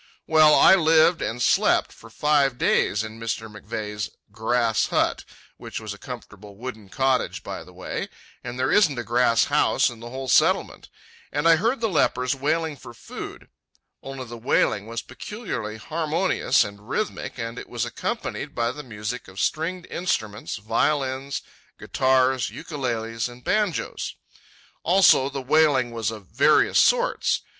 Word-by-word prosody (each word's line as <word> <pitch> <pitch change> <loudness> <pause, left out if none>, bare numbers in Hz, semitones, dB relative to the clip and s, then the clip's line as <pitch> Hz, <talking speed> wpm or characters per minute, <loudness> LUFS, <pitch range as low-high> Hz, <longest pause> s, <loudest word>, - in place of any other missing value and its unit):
Well, 155 -1 +6
I - - +7
lived 165 -1 +4
and 115 - -3
slept - - +3
for - - -15
five 145 -4 +2
days 105 -3 +2
in 110 +1 -8
Mr. 115 0 -3
McVeigh's 105 0 -5 0.2
"grass 115 +1 +1
hut" - - 0 0.3
(which - - -7
was 110 -2 -6
a 105 - -13
comfortable 105 -5 -10
wooden 110 -3 -8
cottage, 130 +4 0
by - - -6
the - - -16
way; - - -5 0.3
and 120 0 -6
there 130 +1 0
isn't 165 -11 +4
a 120 - -2
grass 120 -1 +3
house - - +2
in 115 - -12
the 120 +1 -8
whole 130 +1 -6
Settlement), - - +2 0.4
and 145 +3 0
I 165 - +7
heard 230 +7 0
the 225 - +2
lepers 130 - +1
wailing 150 +3 -1
for 120 -1 -12
food—only 135 +2 -10
the 120 0 -9
wailing 110 -3 +1
was 115 0 -5
peculiarly 180 - -6
harmonious 160 - +1
and 100 +3 -10
rhythmic, 215 - -3
and 115 0 -5
it - - -10
was 120 -1 -2
accompanied 120 - -4
by 115 0 0
the 145 +3 -8
music 110 -1 -6
of 95 +1 -10
stringed 170 - -1
instruments, 110 - -3
violins, 130 +5 -1 0.3
guitars, 130 -1 +2
ukuleles, 115 -5 -3
and 120 0 -14
banjos. 210 -6 -1 0.7
Also, 175 -7 +5
the 135 -1 -5
wailing 140 -3 +3
was 115 -2 -2
of 110 -3 -8
various 135 +10 +3
sorts. - - +2
125 Hz, 150 wpm, -24 LUFS, 115-150 Hz, 0.7 s, I